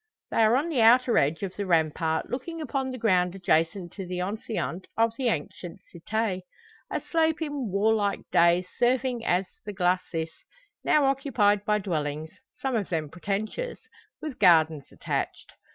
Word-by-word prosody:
They - - -2
are 225 +1 +5
on 295 +6 0
the 275 -8 +1
outer 240 +2 +5
edge 150 +6 0
of 190 -2 -4
the 200 -1 -3
rampart, 160 -1 +1
looking 300 +7 -5
upon 270 -3 -2
the 255 - -5
ground 185 -5 +2
adjacent 175 0 0
to 195 - -6
the 180 0 -4
enceinte 195 -1 -3
of 225 0 +3
the 255 0 -1
ancient 175 -1 -3 0.3
cite. 220 -4 0 0.5
A - - -1
slope 320 -1 +1
in 290 -7 -3
warlike 205 0 +1
days 170 +2 +4
serving 250 -1 +1
as 185 -3 +1 0.2
the 210 - -6
glacis, 180 -3 0 0.5
now 300 -2 +4
occupied 245 -7 +2
by 210 0 +2
dwellings, 155 -5 -3 0.3
some 265 -2 -2
of 210 -4 -1
them 155 -4 -2
pretentious, 215 - -3 0.5
with 305 -4 -5
gardens 160 -6 +4
attached. - - -4
205 Hz, 155 wpm, -27 LUFS, 175-250 Hz, 0.5 s, are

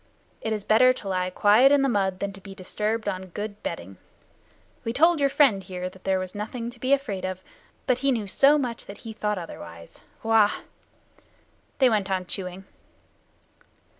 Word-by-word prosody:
It 220 - -3
is 210 -2 -2
better 255 +5 +5
to 220 - -9
lie 185 -1 0
quiet 210 +8 +5
in 285 -1 +4
the - - +3
mud 195 -6 0
than 200 0 -2
to 195 - -13
be 195 0 -10
disturbed 210 +4 -3
on 190 -1 -3
good 205 +3 -6
bedding. 90 +2 -6 0.9
We 230 - -2
told 330 +4 +4
your 280 -1 +3
friend 270 -8 +4
here 185 -1 -6
that 190 - -18
there 190 -1 +2
was 185 0 -4
nothing 230 +3 -5
to 245 - -16
be 260 +3 -1
afraid 270 -9 0
of, 185 0 -4 0.4
but 255 -1 +2
he 275 +1 +2
knew 225 -5 -1
so 275 +9 +4
much 245 -5 -3
that 200 - -9
he 225 - -6
thought 210 -1 -2
otherwise. 85 - -9 0.2
Wah!" 225 -2 +4 1.2
They 265 - +5
went 210 -5 +1
on 185 -1 -1
chewing. 185 +1 -5
210 Hz, 185 wpm, -25 LUFS, 185-245 Hz, 1.2 s, better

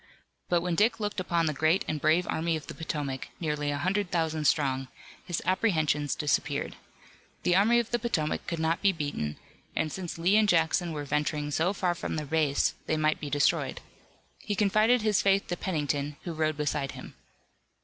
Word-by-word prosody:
But 175 -1 +3
when 175 0 -1
Dick 215 +7 +2
looked 210 -2 -2
upon 170 -2 +1
the 155 - 0
great 160 +6 +2
and 155 -2 -2
brave 160 +3 +3
Army 165 +1 0
of 155 - -6
the - - -7
Potomac, 145 -5 -4
nearly 150 -3 -1
a 145 - -1
hundred 190 +5 0
thousand 160 -3 -1
strong, 135 -3 +1 0.4
his 175 -2 -3
apprehensions 160 -7 +1
disappeared. 145 -1 -1 0.7
The 175 - +3
Army 215 +5 +5
of 235 -1 0
the 240 - +1
Potomac 190 -11 -1
could 170 - -2
not 160 +1 0
be 200 - +4
beaten, 145 - -3 0.4
and 155 -1 0
since 180 -1 -5
Lee 180 +5 +3
and 215 -1 +4
Jackson 165 0 +2
were 145 -2 -4
venturing 150 +1 -1
so 165 +5 +1
far 185 -3 0
from 170 - -4
their 155 -1 -3
base, 150 -1 +1
they 155 - +1
might 155 0 +1
be 145 - -5
destroyed. 145 +1 +1 0.6
He 210 - -3
confided 215 +4 +3
his 215 -3 +3
faith 195 0 +3
to 175 - 0
Pennington 145 -5 -2
who 170 - -4
rode 155 -1 0
beside 145 -2 -1
him. - - -10
160 Hz, 190 wpm, -28 LUFS, 150-185 Hz, 0.7 s, Army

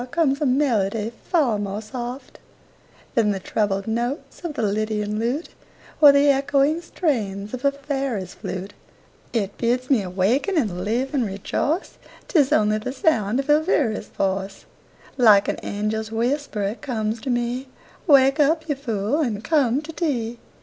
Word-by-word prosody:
comes 290 -2 +1
a - - +2
melody 230 -5 +1
far 270 - +2
more 200 0 -3
soft 245 +4 -7 0.7
Than 225 -5 +3
the 200 -2 -1
troubled 195 0 -1
notes 240 +10 -3
of 315 -4 -5
a - - 0
lydian 210 0 -1
lute 250 +8 -2 0.5
Or 290 -2 +10
the 280 +1 +4
echoing 280 +3 +2
strains 215 - -2
of 255 - -5
a 280 - +4
fairy's 270 - -3
flute; 190 +2 -6 0.6
It 205 -4 -2
bids 250 +3 0
me 250 -6 +4
awaken 200 - 0
and 190 - 0
live 240 +7 -1
and 270 -4 +2
rejoice, 225 - -2 0.3
'Tis 295 -5 +3
only 215 -6 +3
the 255 +4 -4
sound 250 -5 +1
of 275 - -3
Elviry's 295 - +2
voice 195 0 -3 0.5
Like 210 -5 +6
an - - -1
angel's 215 +1 -3
whisper 235 -1 -1
it 200 +4 -3
comes 220 -3 -2
to 265 - -5
me: 245 +2 -1 0.4
"Wake 275 -1 +5
up, 315 +2 +2
you 295 - +1
fool, 240 -1 -2
and 225 -8 -1
come 285 -3 +2
to 320 - -7
tea." 240 -9 -2
240 Hz, 155 wpm, -23 LUFS, 210-280 Hz, 0.7 s, Or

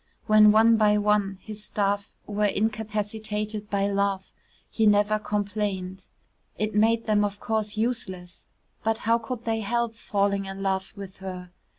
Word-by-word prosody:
When 215 -1 +7
one 225 +1 +5
by 210 -1 +4
one 205 -2 +1
his 215 -1 -6
staff 205 -1 -1
were 210 0 0
incapacitated 215 0 -2
by 200 -1 +1
love, 200 -1 -1 0.3
he 220 -1 +1
never 210 +1 +3
complained. 200 -3 -3 0.5
It 215 +1 -1
made 225 +2 +3
them 210 -1 +2
of 205 0 -2
course 215 -2 -2
useless, 190 -6 -4 0.4
but 225 0 +1
how 230 +1 +2
could 235 +1 -6
they 225 -1 0
help 235 +2 -1
falling 200 -3 -1
in 195 0 -6
love 190 -1 -1
with 195 -2 -9
her? 185 -2 -7
210 Hz, 150 wpm, -26 LUFS, 200-220 Hz, 0.5 s, When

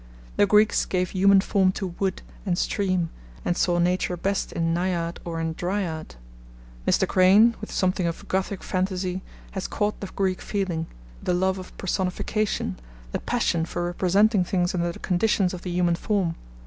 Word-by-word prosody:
The 205 - +4
Greeks 210 +1 +4
gave 180 -1 -1
human 195 +1 +5
form 190 -1 +2
to 195 - -3
wood 195 -1 -1 0.2
and 180 -4 0
stream, 185 -5 0 0.3
and 175 - +1
saw 175 -1 +2
Nature 180 +1 +1
best 195 +3 -1
in 165 0 0
Naiad 170 -1 -1
or 165 -1 -4
in 165 0 -1
Dryad. 175 - -3 0.7
Mr. - - +3
Crane, 200 +6 +6
with 215 - -6
something 185 -1 +1
of 165 - -5
Gothic 190 +1 -1
fantasy, 185 0 -1 0.3
has 190 - -3
caught 210 0 -1
the 200 - -5
Greek 185 -1 -1
feeling, 180 -6 -2 0.3
the 180 - 0
love 190 +1 +1
of 185 - -11
personification, 190 - -1 0.3
the - - -2
passion 210 -9 0
for 175 +1 -3
representing 190 +3 +3
things 180 0 0
under 175 -1 0
the - - -10
conditions 190 0 +1
of 180 - -6
the 185 - -5
human 175 -1 +2
form. 180 -1 0
185 Hz, 165 wpm, -25 LUFS, 175-195 Hz, 0.7 s, Crane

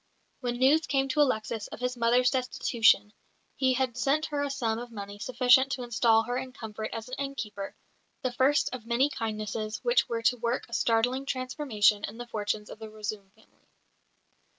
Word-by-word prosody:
When 245 -1 -2
news 280 +6 +4
came 270 -1 +1
to 295 +3 +2
Alexis 220 -5 0
of - - -9
his 250 0 -2
mother's 245 +1 +3
destitution 235 -5 +2 0.4
he 260 -1 +2
had 255 -2 0
sent 280 +5 +1
her 290 -2 -2
a 285 - -1
sum 230 -5 -1
of 240 0 -8
money 205 -2 -8
sufficient 255 +3 +4
to 250 - -4
install 230 -2 +3
her 245 +2 -2
in 255 0 -5
comfort 220 -2 -6
as 225 +1 -6
an 255 - -11
innkeeper: 210 -8 -5 0.5
the 255 - 0
first 265 +3 +2
of 250 -3 -6
many 255 +5 +2
kindnesses 215 -1 -3
which 485 0 +2
were 230 -1 -2
to 250 +2 +3
work 235 +1 -2
a 235 - -14
startling 245 +4 +1
transformation 255 -6 +1
in 210 - -9
the 240 - -6
fortunes 210 -2 -3
of - - -10
the 220 -1 -8
Razoum 215 -2 -6
family. 220 - -28
240 Hz, 185 wpm, -28 LUFS, 220-260 Hz, 0.5 s, news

